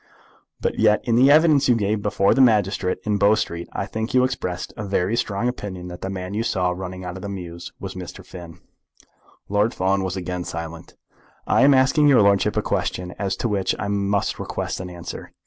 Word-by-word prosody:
"But - - -1
yet 105 - +4
in 115 - +1
the 130 +3 +6
evidence 150 -2 +5
you 120 - +5
gave 105 -1 0
before 100 -1 +2
the 135 - +3
magistrate 100 -6 +2
in 105 -1 0
Bow 100 +2 +5
Street 85 -5 -4
I - - -3
think 110 +4 -4
you 125 - +5
expressed 100 -9 -3
a 105 - -5
very 100 +1 0
strong 105 0 -1
opinion 95 -7 -5
that 90 - -9
the 95 - -4
man 95 0 -5
you 105 - -1
saw 95 -6 0
running 90 0 -6
out 90 +1 -5
of - - -9
the 100 - -5
mews 85 -3 -7
was - - -6
Mr. - - -9
Finn?" 85 -3 -11 0.9
Lord 105 +3 +1
Fawn 95 +1 +1
was 95 0 -3
again 90 -1 -4
silent. 85 0 -7 0.5
"I - - +3
am 140 0 +6
asking 135 +3 +4
your 130 -7 +6
lordship 100 -1 +2
a - - +1
question 90 0 -2
to 95 +3 -1
which 100 -4 0
I 100 - -3
must 100 0 0
request - - -4
an 95 -1 -6
answer. 85 -1 -8
100 Hz, 205 wpm, -22 LUFS, 90-110 Hz, 0.9 s, the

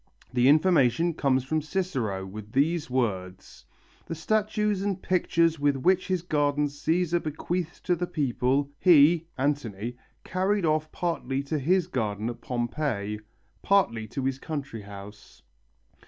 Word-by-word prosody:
The 125 +1 +4
information 155 -1 +4
comes 135 -4 +1
from 155 +4 -1
Cicero 140 - -2
with 105 +2 -9
these 155 +3 +1
words: 95 - -3 0.4
"The 165 - -4
statues 210 +3 0
and 195 -2 -1
pictures 170 -3 +1
which 145 -1 +2
with 180 +8 +3
his 185 -3 -1
gardens 145 -3 0
Cæsar 170 +3 +1
bequeathed 165 +3 -4
to 180 - +2
the 175 +1 -3
people, 140 -1 0
he 165 -1 +6
(Antony) 125 -5 -2 0.3
carried 190 +1 0
off 155 0 0
partly 140 -6 -2
to 150 +2 -2
his 175 +5 +2
garden 110 - -2
at 120 - -12
Pompeii, 120 -4 -2 0.4
partly 115 - +2
to 130 +4 -4
his 135 0 -1
country 135 -8 -5
house." 100 +1 -12
145 Hz, 135 wpm, -27 LUFS, 120-175 Hz, 0.4 s, he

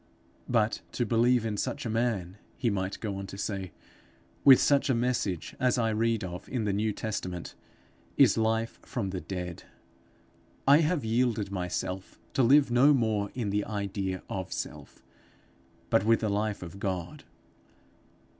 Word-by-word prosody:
'But 115 -2 +1
to 120 - 0
believe 120 +1 +3
in 105 -2 -2
such 125 +3 -3
a - - -2
man,' 105 -5 -1 0.2
he 120 -3 +1
might 95 -1 -2
go 100 -3 -3
on 100 0 -6
to 100 - -8
say, 95 -3 -3 0.7
'with 135 -2 +9
such 140 0 +3
a 130 - +3
message, 115 -8 -1
as 125 -1 +2
I 115 -2 +1
read 115 0 +1
of 90 +1 -7
in 120 -4 -1
the 105 -2 0
New 105 +2 0
Testament, 90 -5 -4 0.6
is - - +6
life 110 0 0
from 100 -6 -4
the 95 -1 -4
dead. 90 0 -6 1.0
I 140 +1 +8
have 160 -5 +1
yielded 110 -3 +1
myself, 90 0 -4 0.2
to - - +2
live 135 +2 +5
no 135 +5 +6
more 110 -5 0
in 115 -5 -2
the 105 +1 +1
idea 100 -3 -3
of 95 -1 -5
self, - - -6 0.9
but - - +4
with 115 +1 +3
the 110 - 0
life 105 -1 -1
of 90 +3 -9
God. 90 -3 -4
110 Hz, 160 wpm, -29 LUFS, 95-120 Hz, 1.0 s, with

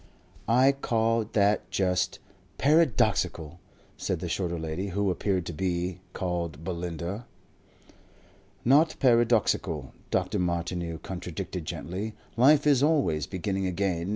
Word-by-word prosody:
"I 130 +4 +5
call 115 -4 0
that 100 -2 +2
just 90 -1 0 0.4
paradoxical," 130 - +2 0.4
said - - -2
the - - -4
shorter 85 -3 -2
lady, 80 +4 -3
who 100 +1 0
appeared 95 -1 -1
to 85 - -5
be 90 +2 -2
called 85 -4 -3
Belinda. 90 +4 -4 1.4
"Not 150 +6 +5
paradoxical," 120 -4 +2 0.2
Dr. - - 0
Martineau 85 -1 -2
contradicted 90 -1 -6
gently. 100 +6 -5 0.2
"Life 140 +5 +5
is 140 -3 +4
always 140 - +2
beginning 95 0 -2
again. 90 -1 -1
95 Hz, 110 wpm, -27 LUFS, 85-115 Hz, 1.4 s, I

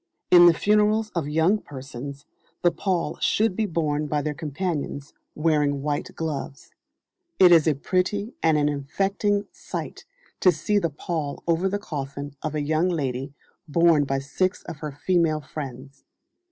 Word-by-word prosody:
In 175 -1 +9
the 170 - +7
funerals 210 +2 +2
of 160 -5 -2
young 165 +7 +3
persons, 140 -2 -8 0.4
the 175 - +5
pall 185 -3 -1
should 215 -3 +2
be 220 0 0
borne 155 -4 -1
by 150 0 -1
their 150 - -2
companions, 150 -2 -4 0.2
wearing 150 -3 +1
white 145 -1 -3
gloves. 150 -3 -5 0.7
It 180 -2 +7
is 165 -2 +6
a 155 - +3
pretty 190 - -1
and 160 -2 +3
an 145 0 +2
affecting 195 +8 0
sight - - -7 0.3
to 185 - +6
see 190 +6 0
the 170 -4 0
pall 150 -1 -4
over 170 +3 +2
the 200 - -1
coffin 140 -6 -6
of 155 -1 -3
a 150 - -1
young 160 +4 +1
lady 135 -4 -3 0.3
borne 165 -1 +4
by 135 0 -1
six 185 +8 -1
of 170 -3 -8
her 150 0 -5
female 165 -4 +2
friends. 135 -2 -8
155 Hz, 155 wpm, -25 LUFS, 145-185 Hz, 0.7 s, In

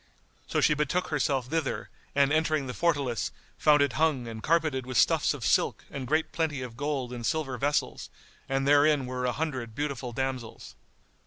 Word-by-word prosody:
So - - 0
she - - +4
betook 150 +5 0
herself 140 -4 0
thither 155 +1 -2 0.3
and 140 +1 +4
entering 155 -2 +1
the 125 - -5
fortalice, 140 -9 0 0.3
found 150 -2 +5
it 140 -4 0
hung 145 -5 +1
and 110 -1 -7
carpeted 155 -4 +1
with 130 0 -3
stuffs - - +4
of - - -6
silk - - +1
and 135 -3 -5
great 155 +3 +1
plenty 150 -5 -1
of 120 -2 -8
gold 135 -2 -2
and 120 -1 -6
silver 150 -1 -1
vessels; 145 +2 -1 0.4
and 135 0 0
therein 145 -1 +4
were 125 0 -2
an 125 - 0
hundred 130 -7 -3
beautiful 140 -3 -3
damsels. 130 -1 -4
140 Hz, 175 wpm, -28 LUFS, 125-150 Hz, 0.4 s, found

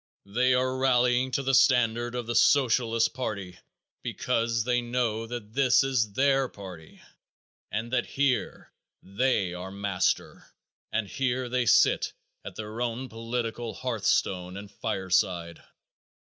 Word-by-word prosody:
They 125 +6 +2
are 130 +1 0
rallying 125 -1 +3
to 135 - 0
the 135 0 0
standard 120 -2 +3
of 120 -1 -3
the 120 - -3
Socialist 115 -4 +3
party 100 -8 -5 0.4
because 115 -1 -1
they 125 +1 +1
know 120 -2 -1
that 110 -3 -7
this 135 -1 +4
is 125 -6 0
their 135 +1 +2
party 90 -6 -11 0.7
and 115 +3 -3
that 120 -1 +1
here 140 -2 -1 0.3
they 100 -3 0
are 90 +1 -6
master, 100 -2 -1 0.4
and 110 -2 -1
here 130 +3 -1
they 125 -1 0
sit - - +4 0.3
at - - -8
their 110 +2 -6
own 125 +2 -3
political 115 0 -4
hearthstone 95 -6 -1
and 100 0 -9
fireside. 90 -3 -1
120 Hz, 130 wpm, -27 LUFS, 100-125 Hz, 0.7 s, this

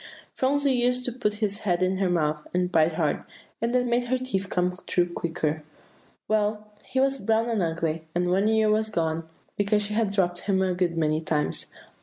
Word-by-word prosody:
Phronsie 280 +1 +2
used 250 0 +1
to 250 - -1
put 230 -4 -1
his 210 -1 -2
head 180 -4 0
in 185 +1 +1
her 190 -1 +1
mouth, 155 -3 0
and 180 0 +1
bite 160 -1 +3
hard, 155 -4 0 0.4
and 230 +1 0
that 250 0 +3
made 240 0 +1
her 255 +1 +1
teeth 200 -7 -2
come 180 0 0
through 175 -1 +1
quicker. 160 -2 -2 0.7
Well, 210 0 0 0.2
he 260 - -2
was 270 0 +2
brown 225 +1 +1
and 225 -4 0
ugly, 165 -1 -2
and 175 0 +1
one 195 +4 +2
ear 220 -1 +3
was 220 +1 +1
gone, 160 -4 -2 0.3
because 210 +1 +2
she 205 +1 -3
had 220 -1 +1
dropped 180 -3 +1
him 190 0 +1
a 185 -1 +1
good 175 -2 0
many 155 -1 +1
times. 155 -2 -1
195 Hz, 200 wpm, -26 LUFS, 170-220 Hz, 0.7 s, bite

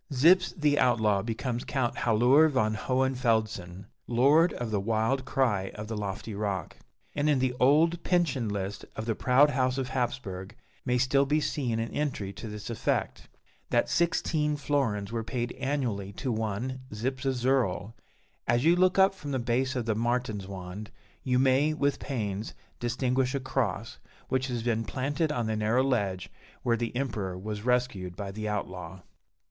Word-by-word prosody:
Zyps, 170 +7 +4
the 150 -1 +3
outlaw, 110 -5 +3
becomes 120 +2 -3
Count 130 -4 -1
Hallooer 125 +7 +5
von 110 -7 +1
Hohenfeldsen 110 -7 0 0.2
"Lord 140 +8 +4
of 120 -3 -4
the 105 - +1
wild 115 +6 0
cry 105 -9 +1
of 105 0 -6
the 110 - -4
lofty 105 +1 -4
rock;" 100 -2 -3 0.4
and 145 +1 +1
in 145 - +4
the 130 -1 +1
old 160 +6 +4
pension 150 - +1
list 100 0 -4
of 110 - -4
the 115 - 0
proud 130 +6 +4
house 130 -1 +1
of 130 -2 -2
Hapsburg 120 -7 -3 0.3
may 125 0 +2
still 135 +2 +3
be 150 +2 +2
seen 130 -6 -1
an 115 0 -2
entry 120 -10 -2
to 115 - -8
this 105 +1 -6
effect: 115 - -2 0.4
that - - +2
sixteen 155 -3 +1
florins 125 -8 -1
were 115 -1 -2
paid 120 +1 -3
annually 130 -8 -2
to 130 +6 -3
one 110 +4 -2
"Zyps 130 +6 -3
of 135 -1 +1
Zirl." 120 -5 0 0.5
As 120 +4 +2
you 170 +2 +6
look 185 +1 +3
up 195 0 +6
from 150 -7 -8
the 135 - 0
base 130 +2 0
of 125 -3 -1
the 110 - +1
Martinswand, 105 -5 -3 0.3
you 125 -1 +1
may, 135 +4 +3
with 145 -2 0
pains, 105 -6 -3 0.2
distinguish 125 +2 0
a - - 0
cross, 125 -2 -2 0.3
which 130 0 0
has 120 -3 -3
been 115 -1 0
planted 145 +7 -1
on 120 -5 -1
the 110 0 -1
narrow 110 +4 +2
ledge 100 -9 -1 0.3
where 120 - +2
the 115 +1 -3
Emperor 105 -8 -2
was 105 +2 -5
rescued 120 -7 0
by 100 0 -5
the 110 +1 -4
outlaw. 95 -3 -5
120 Hz, 165 wpm, -28 LUFS, 105-135 Hz, 0.5 s, you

